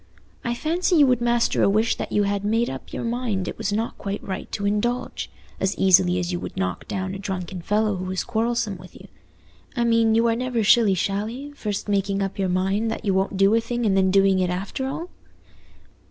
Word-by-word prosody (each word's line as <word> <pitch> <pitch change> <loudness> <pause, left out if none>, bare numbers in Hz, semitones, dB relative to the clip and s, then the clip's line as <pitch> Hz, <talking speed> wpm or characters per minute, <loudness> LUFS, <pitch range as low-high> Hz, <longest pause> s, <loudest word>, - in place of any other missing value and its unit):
I 240 0 -1
fancy 345 +7 0
you 300 -3 +7
would 250 -2 +2
master 240 0 +2
a - - +4
wish 215 +3 +2
that - - -5
you 205 - +2
had 200 0 -1
made 225 +3 +1
up 130 - -8
your - - -4
mind 230 -5 -2
it - - -6
was 200 - -1
not 220 +3 -2
quite 200 0 -4
right 190 -1 -5
to 200 - -3
indulge, 210 +5 -1 0.3
as 190 +1 0
easily 185 -1 +4
as 180 0 -2
you 175 - -2
would - - -7
knock 90 -1 -2
down 190 -1 -3
a 195 - -6
drunken 185 -2 -5
fellow 210 +2 +1
who 185 - -4
was 185 0 -2
quarrelsome 230 -3 -1
with 180 +1 -14
you. - - -13 0.7
I 240 - +1
mean, 230 -1 +3
you 230 +1 +3
are 230 - +2
never 245 -2 -1
shilly 210 -2 +5
shally, 215 +10 -3
first 210 -9 -4
making 200 -1 0
up 195 0 -4
your 190 -1 +1
mind 195 +5 0
that - - -4
you 195 - +2
won't 190 +1 0
do 195 +2 +4
a 230 - +3
thing, 240 +1 -2
and 200 -3 +2
then 190 -1 +3
doing 195 0 +4
it 180 -1 +1
after 195 +9 -3
all?" 320 +6 -5
205 Hz, 225 wpm, -23 LUFS, 190-235 Hz, 0.7 s, you